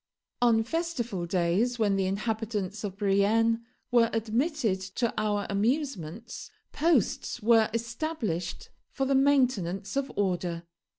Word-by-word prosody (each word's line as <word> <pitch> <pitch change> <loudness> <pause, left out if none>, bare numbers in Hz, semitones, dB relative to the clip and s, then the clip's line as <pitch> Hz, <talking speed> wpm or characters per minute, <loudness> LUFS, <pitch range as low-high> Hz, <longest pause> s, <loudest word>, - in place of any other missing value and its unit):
On 230 -2 +4
festival 240 - -2
days, 185 +8 +1
when 210 -3 +2
the 190 -1 +1
inhabitants 210 0 -2
of 195 -2 -4
Brienne 215 +3 +2 0.3
were 235 -2 +5
admitted 225 - 0
to 195 +5 -2
our 205 -1 0
amusements, 225 - -2 0.2
posts 295 - +1
were 225 -1 +5
established 230 - -3 0.2
for 270 - -2
the 275 - +1
maintenance 250 -9 +2
of 275 0 -1
order. 180 -3 -1
220 Hz, 115 wpm, -28 LUFS, 195-245 Hz, 0.3 s, were